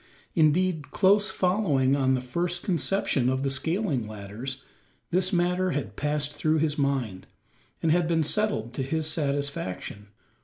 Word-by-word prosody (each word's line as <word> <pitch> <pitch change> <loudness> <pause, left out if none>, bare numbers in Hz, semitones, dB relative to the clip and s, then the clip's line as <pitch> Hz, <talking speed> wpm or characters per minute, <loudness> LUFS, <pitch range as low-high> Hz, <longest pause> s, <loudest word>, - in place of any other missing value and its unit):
Indeed, 160 0 +2
close 205 +2 +3
following 160 -9 +2
on 130 -1 +2
the 130 - -2
first 170 +7 -2
conception 170 -8 +1
of 130 +1 0
the 135 - 0
scaling 145 - 0
ladders, 110 +6 -6 0.5
this 185 +2 +1
matter 180 0 +1
had 110 -9 -3
passed 150 0 -1
through 155 +1 +1
his 155 -1 +1
mind, 135 - -1 0.6
and 160 - +3
had 175 0 +3
been 165 -1 +2
settled 150 - 0
to 135 - -3
his 155 +4 -1
satisfaction. 140 - -2
150 Hz, 145 wpm, -27 LUFS, 130-175 Hz, 0.6 s, close